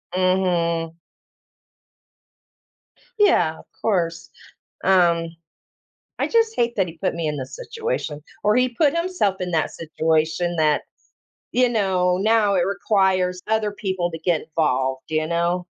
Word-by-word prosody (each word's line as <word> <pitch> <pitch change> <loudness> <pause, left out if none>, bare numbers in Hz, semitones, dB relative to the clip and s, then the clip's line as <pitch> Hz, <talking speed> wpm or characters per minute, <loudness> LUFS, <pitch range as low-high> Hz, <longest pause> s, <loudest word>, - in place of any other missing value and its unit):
Mhm. 175 -3 +1 2.3
Yeah, 175 - +3
of - - -15 0.2
course. 170 -6 -1 0.5
Um 170 -3 +3 0.8
I - - 0
just 455 -1 +2
hate 235 - 0
that 190 -3 +2
he 165 -1 -10
put - - -1
me 165 -1 -3
in 150 -1 -1
this 130 - -7
situation, 455 - -4 0.2
or 210 +1 +4
he 255 +1 +3
put 280 +5 +1
himself 335 - 0
in 180 -1 -3
that 160 -2 0
situation 160 +2 0
that, 155 -2 +2 0.7
you 250 0 +3
know 185 -5 +1
now 210 0 +3
it 175 -2 +2
requires 190 -2 +1
other 220 -1 +1
people 190 -4 -2
to 165 - -5
get 165 -1 +1
involved, 135 -5 -1
d 155 - -4
you 155 0 +1
know? 170 +2 0
180 Hz, 135 wpm, -22 LUFS, 165-210 Hz, 2.3 s, or